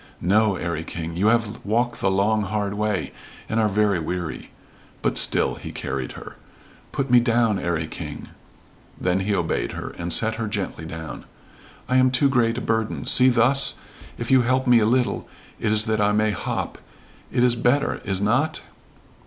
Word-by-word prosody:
"No, 105 +3 +2
'Arry 85 -2 -3
King. 85 0 -6
You 95 +5 +1
have 115 -1 +1
walk 120 +3 0
the 95 - +1
long, 100 +3 +2
hard 100 0 -2
way, 105 -2 -2 0.3
and 110 - -1
are 110 -1 +3
very 105 -2 +2
weary." 85 0 -4 0.5
But - - +1
still - - +2
he - - -8
carried 65 -2 -4
her. - - -11 0.5
"Put 135 -2 -2
me 125 - +8
down, 115 -4 +2
'Arry 85 -2 -1
King." - - -8 0.7
Then 90 +1 +1
he 100 +2 0
obeyed 85 -3 -1
her, - - -5
and 85 0 -3
set 110 +5 +2
her 115 -1 -2
gently 100 -6 -4
down. 80 -1 -7 0.6
"I 130 0 +2
am 130 0 +5
too 135 +2 +2
great 120 -3 +2
a - - -2
burden. 110 -2 -1
See, 130 +1 +6
thus? 125 +3 +3 0.4
If 120 +1 -4
you 130 -1 +6
help 130 +2 +1
me 125 -2 +6
a 105 - +2
little 125 +1 0 0.3
it 105 - 0
is 110 0 +3
that 110 -2 0
I 105 0 +3
may 105 0 +2
hop 100 - -4 0.5
It 125 0 +2
is 125 -1 +3
better, 125 +4 +1
is 95 -2 -1
not?" 125 +10 +1
110 Hz, 180 wpm, -23 LUFS, 95-120 Hz, 0.7 s, me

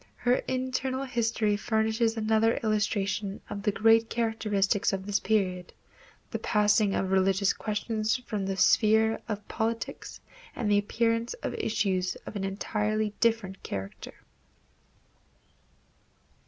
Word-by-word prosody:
Her 245 +1 +2
internal 260 +1 -2
history 230 -4 0
furnishes 220 +1 0
another 220 +1 +2
illustration 205 -2 -1
of 200 - -4
the 210 - +1
great 225 +2 +4
characteristic 210 -4 0
of 190 0 -3
this 205 0 0
period, 185 -4 -1 0.6
the - - -3
passing 210 -1 +2
of 190 0 -1
religious 190 +1 +3
questions 215 +1 -1
from 210 -6 -4
the 195 -1 -2
sphere 220 +2 +4
of 210 -1 -4
politics 230 0 -3 0.4
and 210 -3 -1
the 205 - +5
appearance 230 - 0
of - - -2
issues 185 -4 0
of - - -8
an 200 - -3
entirely 210 +2 -1
different 225 -5 0
character. 95 0 -7
215 Hz, 120 wpm, -28 LUFS, 200-225 Hz, 0.6 s, the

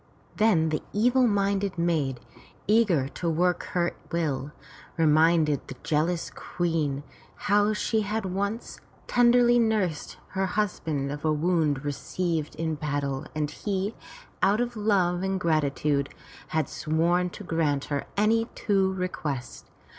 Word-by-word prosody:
Then 185 -8 +3
the 155 - -1
evil 245 +4 +4
minded 200 -2 0
maid, 155 -7 0 0.5
eager 205 -11 +3
to 170 - -3
work 175 +2 +1
her 175 -1 +1 0.2
will, 150 -4 -1 0.5
reminded 155 -2 +3
the 135 - -7
jealous 165 +3 0
Queen 160 -5 -2 0.3
how 205 +1 +2
she 220 +1 0 0.2
once 200 +4 -3 0.3
tenderly 240 0 +5
nursed 210 -9 0
her 190 -1 -1
husband 160 -9 -1
of 145 0 -6
a 155 - +2
wound 155 -3 +1
received 160 +2 -2
in 160 0 -2
battle 140 -2 -2
and 150 -1 -1
he, 195 +5 -2 0.5
out 205 +3 +3
of 240 0 -1
love 190 -5 +1
and 190 0 -1
gratitude, 145 -3 +1 0.4
had 155 -3 0
sworn 170 +3 +1
to 205 - -10
grant 155 -5 0
her 145 -1 -2
any 225 +2 +3
two 195 -3 +1
requests. 155 -8 -4
170 Hz, 125 wpm, -27 LUFS, 150-200 Hz, 0.5 s, tenderly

